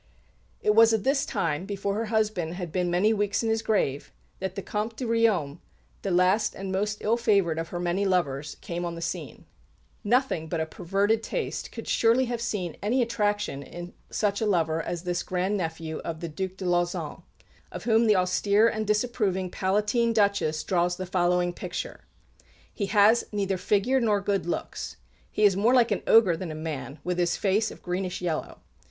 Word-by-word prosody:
It 210 - +3
was 225 +1 +6
at 220 -3 +1
this 275 +1 +1
time, 165 +3 -1
before 200 -1 -2
her 220 +3 -1
husband 210 -6 0
had 175 -3 -5
been 180 0 0
many 185 +6 +3
weeks 205 +1 0
in 225 - 0
his 225 0 +1
grave, 150 -11 0 0.3
that 190 0 -4
the 195 - -4
Comte 215 +2 -3
de 250 - -4
Riom, 215 -10 +1 0.4
the 195 - -3
last 185 +4 +2
and 195 0 -5
most 210 +2 -1
ill 225 +2 +2
favoured 200 -8 +2
of 165 - -3
her 175 - -5
many 175 +3 0
lovers, 150 -7 0
came 175 0 -4
on 170 -1 -3
the 170 - -7
scene. 170 - -5 0.6
Nothing 235 - +1
but 165 - -1
a 160 - 0
perverted 195 +7 0
taste 475 - -4
could - - -8
surely 235 +3 +3
have 240 -1 -3
seen 195 -8 -3
any 245 +5 +2
attraction 205 -9 -1
in 175 +4 -9 0.2
such 205 -1 0
a 220 - +1
lover 165 -4 +1
as 175 0 -4
this 175 -1 -1
grand 185 +3 -1
nephew 160 -3 -3
of 165 -1 -5
the 170 - -4
Duc 190 +4 -4
de 190 - -6
Lauzun, 175 0 -1 0.5
of - - -7
whom 230 0 +3
the 210 - +5
austere 200 +4 +3
and 220 -2 -2
disapproving 210 -4 0
Palatine 210 +5 +1
Duchess 200 -8 +1
draws 175 -1 +1
the 185 - -5
following 180 -1 +1
picture: - - -6 0.7
"He 200 - -2
has 215 +3 +5
neither 200 -2 0
figure 210 +8 +2
nor 210 -3 +2
good 200 -2 -1
looks. 175 - -4 0.3
He 215 - -1
is 200 -3 +6
more 225 +6 +3
like 240 -2 +4
an 205 - 0
ogre 210 -7 +6
than 175 +1 -5
a 155 - -5
man, 150 -3 -5
with 180 0 -2
his 175 -1 +1
face 210 +3 +1
of - - -13
greenish 180 0 -3
yellow. 170 -3 -3
195 Hz, 190 wpm, -27 LUFS, 175-215 Hz, 0.7 s, was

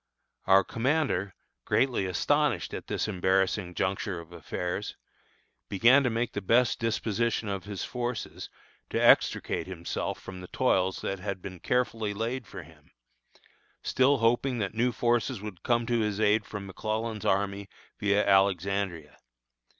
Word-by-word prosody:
Our 95 0 +6
commander, 115 - 0 0.3
greatly 125 -7 +1
astonished 90 -1 +1
at - - -6
this - - -1
embarrassing 95 -1 0
juncture 95 -1 -1
of 85 0 -12
affairs, 90 +3 -4 0.7
began 120 +8 +5
to 130 - +1
make 115 +1 -1
the 105 - -3
best 115 +5 +3
disposition 115 0 0
of 100 -1 -4
his 100 -2 -5
forces, 120 -2 -4 0.4
to - - -1
extricate - - +3
himself 85 -3 -4
from 90 -1 -9
the 90 - -9
toils 95 -7 +1
that 95 - -3
had 100 0 -4
been 90 -1 -8
carefully 115 -3 -1
laid 115 +2 -3
for 95 -4 -8
him; 75 -1 -19 0.9
still 135 +2 +3
hoping 120 +2 +2
that 100 -3 -2
new 120 +3 +1
forces 120 0 0
would 105 -4 -8
come 120 -1 +1
to 120 0 +1
his 105 -2 -1
aid 105 0 +3
from 105 -2 -6
McClellan's 110 +2 -3
army 100 0 0 0.3
via 100 0 +2
Alexandria. 95 -6 +1
105 Hz, 140 wpm, -28 LUFS, 95-115 Hz, 0.9 s, Our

